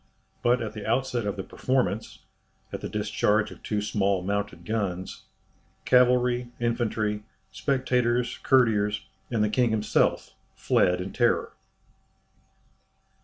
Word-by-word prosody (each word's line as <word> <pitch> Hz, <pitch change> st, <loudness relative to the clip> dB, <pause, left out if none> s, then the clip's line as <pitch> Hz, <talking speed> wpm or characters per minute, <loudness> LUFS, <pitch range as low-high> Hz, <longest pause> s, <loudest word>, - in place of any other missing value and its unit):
But 120 Hz, 0 st, +2 dB
at 110 Hz, -1 st, -5 dB
the 105 Hz, -2 st, -7 dB
outset 120 Hz, -1 st, 0 dB
of 100 Hz, -, -2 dB
the 95 Hz, -, -5 dB
performance 125 Hz, -3 st, -2 dB, 0.5 s
at -, -, -4 dB
the -, -, -4 dB
discharge 105 Hz, 0 st, +1 dB
of -, -, -12 dB
two 105 Hz, -1 st, -2 dB
small 100 Hz, -3 st, 0 dB
mounted 100 Hz, +1 st, -3 dB
guns 100 Hz, -5 st, -3 dB, 0.6 s
cavalry, 125 Hz, -1 st, +3 dB
infantry, 115 Hz, -3 st, -1 dB, 0.3 s
spectators, 125 Hz, -3 st, 0 dB
courtiers, 105 Hz, -5 st, +2 dB, 0.2 s
and 110 Hz, -3 st, +1 dB
the -, -, +3 dB
king 125 Hz, +1 st, +2 dB
himself, 110 Hz, -1 st, +1 dB, 0.2 s
fled 90 Hz, 0 st, +2 dB
in 95 Hz, -, -6 dB
terror. 120 Hz, -1 st, +1 dB
110 Hz, 120 wpm, -26 LUFS, 105-125 Hz, 0.6 s, cavalry